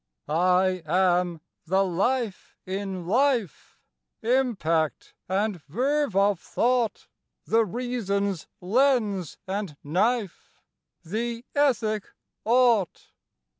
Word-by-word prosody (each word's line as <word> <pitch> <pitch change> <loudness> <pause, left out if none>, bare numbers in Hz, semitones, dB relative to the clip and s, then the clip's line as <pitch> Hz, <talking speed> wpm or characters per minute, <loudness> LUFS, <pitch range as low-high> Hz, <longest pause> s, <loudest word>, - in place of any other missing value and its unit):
I 180 +3 +2
am 175 -1 +2 0.3
the 190 +3 +3
Life 205 +4 -1
in 190 -1 -4
life, 235 - 0 0.5
Impact 210 - 0 0.2
and 195 -2 0
verve 265 - 0
of 200 -2 +3
thought, 240 0 0 0.4
The 225 +1 +3
reason's 200 -5 -2
lens 210 - +1
and 195 -6 -4
knife, 200 +6 -1 0.4
The 230 +7 -3
ethic 225 -7 +1 0.4
"ought." 235 -5 +2
200 Hz, 85 wpm, -26 LUFS, 180-240 Hz, 0.5 s, the